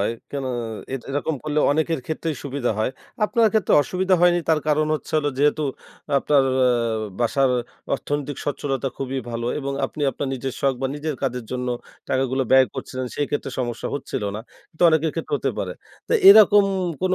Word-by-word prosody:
হয়। 105 Hz, +3 st, +1 dB, 0.2 s
কেন 140 Hz, -1 st, -3 dB, 0.7 s
এরকম 145 Hz, +3 st, -1 dB
করলে 150 Hz, 0 st, -1 dB
অনেকের 160 Hz, 0 st, 0 dB
ক্ষেত্রেই 160 Hz, -1 st, -3 dB
সুবিধা 140 Hz, -3 st, -2 dB
হয়। 110 Hz, -, +1 dB, 0.3 s
আপনার 230 Hz, +1 st, +3 dB
ক্ষেত্রে 220 Hz, -5 st, +2 dB
অসুবিধা 185 Hz, +3 st, +1 dB
হয়নি 175 Hz, 0 st, +4 dB
তার 160 Hz, -1 st, +3 dB
কারণ 155 Hz, 0 st, +2 dB
হচ্ছে 155 Hz, -, -6 dB
হলো 145 Hz, -1 st, 0 dB
যেহেতু 150 Hz, +2 st, +2 dB, 0.6 s
আপনার 140 Hz, 0 st, +3 dB, 0.2 s
আ -, -, +5 dB, 0.5 s
বাসার 130 Hz, +3 st, +2 dB, 0.4 s
অর্থনৈতিক 145 Hz, -1 st, -3 dB
স্বচ্ছলতা 135 Hz, -2 st, -2 dB
খুবই 135 Hz, 0 st, -3 dB
ভালো 115 Hz, 0 st, -3 dB
এবং 140 Hz, -1 st, -3 dB
আপনি 150 Hz, -, -7 dB
আপনার 135 Hz, +1 st, -4 dB
নিজের 130 Hz, +1 st, -4 dB
শখ 135 Hz, -1 st, +2 dB
বা -, -, +2 dB
নিজের 150 Hz, +1 st, -3 dB
কাজের 125 Hz, -3 st, -2 dB
জন্য 125 Hz, 0 st, -2 dB, 0.4 s
টাকাগুলো 130 Hz, 0 st, +1 dB
ব্যয় 130 Hz, 0 st, +7 dB
করছিলেন 130 Hz, -1 st, -5 dB
সেই 145 Hz, -, -1 dB
ক্ষেত্রে 145 Hz, -2 st, -2 dB
সমস্যা 120 Hz, -2 st, -3 dB
হচ্ছিল 140 Hz, -6 st, -4 dB
না। 110 Hz, -, -5 dB, 0.3 s
কিন্তু 160 Hz, -, -5 dB
অনেকের 160 Hz, 0 st, +2 dB
ক্ষেত্রে 160 Hz, -3 st, -3 dB
হতে 135 Hz, -1 st, -1 dB
পারে। 90 Hz, -, -2 dB, 0.4 s
তা -, -, +2 dB
এরকম 205 Hz, 0 st, +8 dB, 0.4 s
কোনো 185 Hz, 0 st, +2 dB
145 Hz, 170 wpm, -23 LUFS, 130-160 Hz, 0.7 s, এরকম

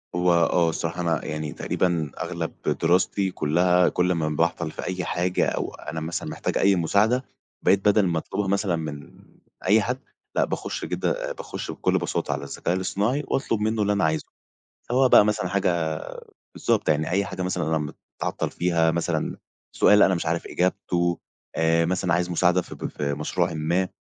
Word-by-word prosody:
هو 90 Hz, 0 st, +3 dB
آه، 85 Hz, 0 st, +3 dB
الصراحة، 85 Hz, +2 st, -3 dB
أنا 85 Hz, -3 st, 0 dB
يعني 75 Hz, -1 st, -4 dB
تقريبًا 85 Hz, -6 st, -1 dB
أغلب 85 Hz, -2 st, -3 dB, 0.3 s
دراستي 90 Hz, +3 st, +2 dB
كلها، 90 Hz, +4 st, +3 dB
كل 90 Hz, 0 st, +1 dB
ما 80 Hz, -3 st, 0 dB
باعطل 85 Hz, +1 st, 0 dB
في -, -, -7 dB
أي 90 Hz, 0 st, -3 dB
حاجة 90 Hz, +1 st, 0 dB
أو -, -, -3 dB
أنا 80 Hz, +2 st, -6 dB
مثلًا 80 Hz, +2 st, -4 dB
محتاج -, -, -2 dB
أي 100 Hz, 0 st, +4 dB
مساعدة، 105 Hz, +9 st, +2 dB, 0.4 s
بقيت 100 Hz, -, +4 dB
بدل 105 Hz, -1 st, +5 dB
ما 85 Hz, -2 st, 0 dB
أطلبها 100 Hz, +4 st, -3 dB
مثلًا 100 Hz, -2 st, +1 dB
من 75 Hz, -3 st, -6 dB, 0.5 s
أي 105 Hz, +3 st, +5 dB
حد، 125 Hz, +4 st, -1 dB, 0.4 s
لأ، -, -, +3 dB
باخش -, -, -4 dB
كده -, -, -2 dB
باخش -, -, -6 dB
بكل -, -, +1 dB
بساطة -, -, -2 dB
على -, -, -4 dB
الذكاء 85 Hz, -, -2 dB
الاصطناعي 105 Hz, +9 st, 0 dB
وأطلب 115 Hz, -5 st, 0 dB
منه 110 Hz, 0 st, 0 dB
اللي 105 Hz, 0 st, +2 dB
أنا 100 Hz, -, 0 dB
عايزه. 80 Hz, 0 st, +1 dB, 0.7 s
سواء 130 Hz, +1 st, +4 dB
بقى -, -, +8 dB
مثلًا 105 Hz, -4 st, 0 dB
حاجة 85 Hz, -5 st, 0 dB, 0.5 s
بالضبط، -, -, 0 dB
يعني 75 Hz, 0 st, +1 dB
أي 100 Hz, +2 st, +2 dB
حاجة 95 Hz, -, -6 dB
مثلًا 90 Hz, -1 st, -1 dB
أنا 75 Hz, -2 st, -3 dB, 0.3 s
متعطل -, -, -1 dB
فيها، 85 Hz, -2 st, +2 dB
مثلًا 85 Hz, 0 st, -1 dB, 0.4 s
سؤال 105 Hz, 0 st, +6 dB
أنا 95 Hz, -, +4 dB
مش 85 Hz, -, -3 dB
عارف 85 Hz, +1 st, -1 dB
إجابته، 85 Hz, -1 st, 0 dB, 0.4 s
آآ، 80 Hz, 0 st, +3 dB
مثلًا 90 Hz, -1 st, 0 dB
عايز 90 Hz, +1 st, +1 dB
مساعدة 90 Hz, +1 st, +3 dB
في -, -, -10 dB
ب -, -, -6 dB
في 70 Hz, -1 st, -3 dB
مشروعٍ 85 Hz, +4 st, -1 dB
ما، 85 Hz, +4 st, 0 dB
90 Hz, 175 wpm, -25 LUFS, 80-95 Hz, 0.7 s, بقى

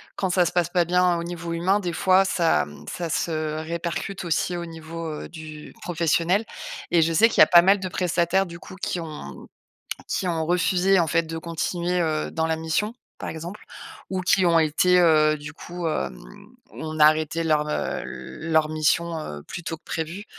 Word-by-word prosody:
quand 190 Hz, -, -1 dB
ça 180 Hz, -1 st, +3 dB
se -, -, -1 dB
passe 175 Hz, -2 st, +1 dB
pas 175 Hz, -2 st, +2 dB
bien 180 Hz, 0 st, +3 dB
au 170 Hz, -, -3 dB
niveau 170 Hz, -1 st, -5 dB
humain, 185 Hz, +5 st, +2 dB
des 175 Hz, -3 st, -3 dB
fois, 190 Hz, +2 st, +4 dB
ça, 165 Hz, -, +2 dB
mmh 75 Hz, -, -13 dB
ça 170 Hz, -2 st, -4 dB
se 155 Hz, -1 st, -1 dB
répercute 170 Hz, +3 st, -4 dB
aussi 175 Hz, +1 st, 0 dB
au 170 Hz, -, -4 dB
niveau, 165 Hz, 0 st, -7 dB
heu, 155 Hz, -1 st, -6 dB
du 155 Hz, -2 st, -10 dB
professionnel, 170 Hz, +4 st, +1 dB, 0.5 s
et 170 Hz, -, +5 dB
je 165 Hz, +1 st, +2 dB
sais 225 Hz, +8 st, +6 dB
qu'il -, -, +3 dB
y -, -, +12 dB
a -, -, +5 dB
pas 175 Hz, -3 st, +8 dB
mal 195 Hz, +2 st, +4 dB
de 185 Hz, -, -3 dB
prestataires, 180 Hz, +1 st, +1 dB
du 170 Hz, -1 st, -10 dB
coup, 185 Hz, -, -11 dB
qui 185 Hz, -2 st, -3 dB
ont 155 Hz, -2 st, -8 dB, 0.6 s
qui 185 Hz, -, -1 dB
ont 165 Hz, -2 st, -1 dB
refusé, 180 Hz, +2 st, +3 dB
en 165 Hz, -, +2 dB
fait, 165 Hz, +1 st, +2 dB
de 165 Hz, 0 st, -6 dB
continuer, 170 Hz, +2 st, -2 dB
heu, 155 Hz, -2 st, -1 dB
dans 160 Hz, 0 st, -1 dB
la 160 Hz, 0 st, 0 dB
mission, 160 Hz, +8 st, -1 dB, 0.2 s
par -, -, -5 dB
exemple, 170 Hz, +5 st, -7 dB, 0.5 s
ou 190 Hz, -1 st, -2 dB
qui 185 Hz, 0 st, +3 dB
ont 165 Hz, -1 st, +5 dB
été, 180 Hz, +4 st, +3 dB
heu, 155 Hz, -2 st, +4 dB
du 150 Hz, +1 st, -9 dB
coup, 175 Hz, -1 st, -6 dB
hem, -, -, -2 dB, 0.5 s
on 155 Hz, 0 st, -6 dB
a 150 Hz, -, +8 dB
arrêté 155 Hz, +1 st, +2 dB
leur, 150 Hz, -1 st, +1 dB
heu, -, -, -2 dB
leur 160 Hz, -1 st, -1 dB
mission, 160 Hz, +2 st, 0 dB
heu, 75 Hz, -, -7 dB
plus 175 Hz, -, -8 dB
tôt 165 Hz, -, -4 dB
que -, -, -38 dB
prévu. 170 Hz, +5 st, -4 dB
170 Hz, 205 wpm, -24 LUFS, 160-180 Hz, 0.6 s, y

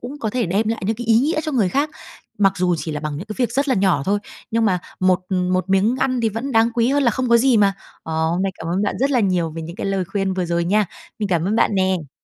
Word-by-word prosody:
cũng 265 Hz, +5 st, -7 dB
có 220 Hz, -6 st, -2 dB
thể 240 Hz, -3 st, -1 dB
đem 205 Hz, +5 st, 0 dB
lại 225 Hz, 0 st, -2 dB
những 220 Hz, 0 st, 0 dB
cái 240 Hz, -, -6 dB
ý 225 Hz, 0 st, +5 dB
nghĩa 310 Hz, +4 st, +1 dB
cho 310 Hz, -, -3 dB
người 225 Hz, -8 st, +2 dB
khác. 285 Hz, +9 st, 0 dB, 0.5 s
Mặc 195 Hz, -2 st, +4 dB
dù 180 Hz, -1 st, +1 dB
chỉ 160 Hz, -, -4 dB
là 150 Hz, -, -4 dB
bằng 150 Hz, -1 st, -4 dB
những 175 Hz, +8 st, -7 dB
cái 215 Hz, -, -6 dB
việc 245 Hz, -2 st, 0 dB
rất 275 Hz, +3 st, 0 dB
là 260 Hz, -, +3 dB
nhỏ 190 Hz, -7 st, +2 dB
thôi, 205 Hz, +2 st, +1 dB, 0.3 s
nhưng 230 Hz, 0 st, +1 dB
mà 190 Hz, -4 st, +2 dB, 0.2 s
một 185 Hz, 0 st, +3 dB
một 185 Hz, 0 st, 0 dB
miếng 205 Hz, +6 st, +3 dB
ăn 255 Hz, -2 st, +1 dB
thì 225 Hz, -, +2 dB
vẫn 230 Hz, +6 st, -4 dB
đáng 225 Hz, 0 st, +4 dB
quý 235 Hz, 0 st, +2 dB
hơn 285 Hz, +2 st, +2 dB
là 240 Hz, -, +4 dB
không 255 Hz, +3 st, -2 dB
có 235 Hz, -, +6 dB
gì 255 Hz, 0 st, +4 dB
mà. 200 Hz, -2 st, +4 dB, 0.3 s
Ờ, 160 Hz, -, -6 dB, 0.2 s
hôm 175 Hz, +3 st, 0 dB
nay 195 Hz, -1 st, -1 dB
cảm 160 Hz, -, -7 dB
ơn 180 Hz, +4 st, 0 dB
bạn 205 Hz, -, -1 dB
rất 275 Hz, +2 st, +1 dB
là 250 Hz, -, +3 dB
nhiều 180 Hz, -5 st, +1 dB
về 165 Hz, +1 st, -6 dB
những 170 Hz, +3 st, -8 dB
cái -, -, -4 dB
lời 195 Hz, -1 st, 0 dB
khuyên 195 Hz, +1 st, -2 dB
vừa 185 Hz, -, -1 dB
rồi 170 Hz, 0 st, 0 dB
nha. 205 Hz, +4 st, +2 dB, 0.3 s
Mình 210 Hz, -2 st, -2 dB
cảm 170 Hz, -3 st, +1 dB
ơn 205 Hz, +4 st, 0 dB
bạn 210 Hz, -, +2 dB
nè! 185 Hz, -6 st, 0 dB
205 Hz, 305 wpm, -20 LUFS, 185-235 Hz, 0.5 s, có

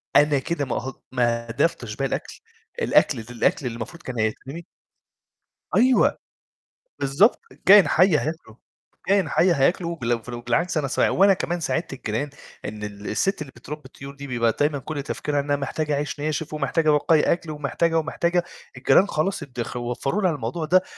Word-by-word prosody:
أنا 145 Hz, -1 st, +5 dB
كده 145 Hz, +1 st, -2 dB
ما 125 Hz, -, -3 dB
اهد 130 Hz, +4 st, -4 dB, 0.2 s
ما 120 Hz, -2 st, 0 dB
أهدرتش 115 Hz, -3 st, -1 dB
باقي 135 Hz, -, -1 dB
الأكل، -, -, -5 dB, 0.4 s
الأكل 145 Hz, -, +3 dB
الأكل 125 Hz, -, -1 dB
اللي 120 Hz, -, -3 dB
المفروض 145 Hz, +9 st, -7 dB
كان 125 Hz, -3 st, -5 dB
هيترمي 135 Hz, +9 st, -3 dB, 1.1 s
أيوه. 255 Hz, +1 st, +4 dB, 0.8 s
بالضبط، 140 Hz, -, +3 dB, 0.3 s
كائن 200 Hz, +2 st, +8 dB
حي 180 Hz, -1 st, +4 dB
هياكله، 150 Hz, -8 st, -5 dB, 0.5 s
كائن 195 Hz, -5 st, +3 dB
حي 175 Hz, +6 st, +3 dB
هياكله 170 Hz, +4 st, +1 dB
بلو 120 Hz, -5 st, -1 dB
فلو 120 Hz, +1 st, -7 dB
بالعكس 170 Hz, +7 st, 0 dB
أنا 145 Hz, -2 st, 0 dB
سا -, -, +2 dB
وأنا 195 Hz, +2 st, +5 dB
كمان 175 Hz, -1 st, -2 dB
ساعدت 160 Hz, -2 st, -2 dB
الجيران 130 Hz, +2 st, -3 dB, 0.4 s
إن 105 Hz, 0 st, -6 dB
ال 105 Hz, 0 st, -7 dB
الست 195 Hz, -, 0 dB
اللي 140 Hz, -3 st, -6 dB
بترّبي 150 Hz, +6 st, -8 dB
الطيور 135 Hz, +1 st, -10 dB
دي 140 Hz, 0 st, -8 dB
بيبقى 115 Hz, -3 st, +1 dB
دايمًا 145 Hz, 0 st, +1 dB
كُلّ 145 Hz, +1 st, -5 dB
تفكيرها 145 Hz, 0 st, -2 dB
إنها 145 Hz, 0 st, 0 dB
محتاجة 145 Hz, +2 st, -2 dB
عيش 145 Hz, +1 st, -3 dB
ناشف، 155 Hz, +1 st, -3 dB
ومحتاجة 155 Hz, +1 st, +1 dB
بواقي 150 Hz, +1 st, +4 dB
أكل، 170 Hz, -2 st, -6 dB
ومحتاجة 160 Hz, +3 st, 0 dB
ومحتاجة. 170 Hz, +2 st, 0 dB, 0.3 s
الجيران 195 Hz, -, +4 dB
خلاص 170 Hz, 0 st, -1 dB
ادخ 125 Hz, -5 st, -6 dB
ووفروا 125 Hz, -, -2 dB
لها 185 Hz, -3 st, +3 dB
الموضوع 145 Hz, +3 st, -3 dB
ده، 185 Hz, +4 st, +4 dB
145 Hz, 165 wpm, -24 LUFS, 125-170 Hz, 1.1 s, كائن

